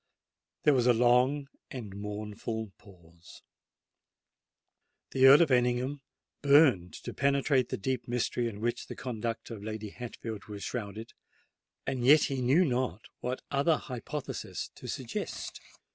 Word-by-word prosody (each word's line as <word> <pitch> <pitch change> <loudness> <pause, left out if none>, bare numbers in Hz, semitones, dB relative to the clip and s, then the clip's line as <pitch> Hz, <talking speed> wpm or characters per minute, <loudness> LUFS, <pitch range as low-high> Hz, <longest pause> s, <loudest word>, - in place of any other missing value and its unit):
There 150 - +5
was 125 -2 +2
a 120 - +6
long 125 +4 +3 0.2
and 110 -7 -7
mournful 105 +1 -5
pause. 85 -3 -17 1.7
The 130 0 +6
Earl 140 +5 +9
of 155 - -1
Ellingham 125 +3 +1 0.4
burned 140 - +5
to - - -5
penetrate 140 -2 +2
the - - -2
deep 125 +3 -2
mystery 120 0 0
in 105 -1 -9
which 120 +1 -2
the - - -7
conduct 115 -2 -4
of 105 -3 -7
Lady 110 0 -5
Hatfield 115 -2 -7
was 105 -2 -8
shrouded; 110 0 -5 0.7
and 130 -2 -2
yet 145 +5 +7
he 135 -2 -1
knew 140 +9 +4
not 125 - -2
what 125 +1 -4
other 145 +4 +3
hypothesis 135 +3 -5
to - - -11
suggest. - - -5
120 Hz, 135 wpm, -30 LUFS, 110-135 Hz, 1.7 s, Earl